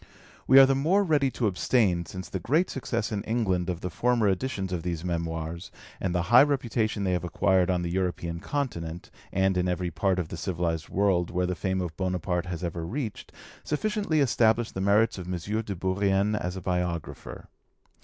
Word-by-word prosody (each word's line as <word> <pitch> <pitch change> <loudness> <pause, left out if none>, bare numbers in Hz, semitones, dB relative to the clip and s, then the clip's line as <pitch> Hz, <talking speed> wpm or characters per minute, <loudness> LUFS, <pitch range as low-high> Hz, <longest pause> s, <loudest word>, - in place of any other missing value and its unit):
We 135 - +7
are 135 - +11
the 135 - +2
more 165 +10 +2
ready 150 -6 +2
to 125 - -2
abstain 95 -3 +1
since 95 -1 -7
the 95 - -4
great 150 - +1
success 115 -4 -2
in 105 -2 -2
England 95 -6 0
of 90 -2 -3
the 90 - -4
former 120 -1 +2
editions 95 -2 -2
of 85 - -2
these 85 -1 -4
Memoirs, 85 -1 -3 0.3
and 90 -2 -2
the 90 - +1
high 125 - +10
reputation 120 -7 0
they 95 - +1
have 90 -1 0
acquired 90 +1 +2
on 90 -1 +1
the 85 - -3
European 85 -2 -2
Continent, 85 - -4 0.2
and 95 0 +2
in 90 0 +1
every 90 -1 -1
part 95 +3 +1
of 85 -3 -2
the - - -6
civilised 85 -3 -2
world 95 -3 +1
where 90 +1 0
the 90 - -1
fame 95 +1 -1
of 85 -3 -4
Bonaparte 90 -1 -1
has 90 0 -5
ever 85 -1 -3
reached, 110 - -5 0.3
sufficiently 200 -1 0
establish 115 -3 +2
the 95 - -4
merits 105 +2 +3
of 90 0 -6
M. 90 - -2 0.2
de 105 -3 -5
Bourrienne 95 +3 +1
as 90 -3 -2
a - - -6
biographer. 90 -3 -3
95 Hz, 195 wpm, -27 LUFS, 90-115 Hz, 0.3 s, are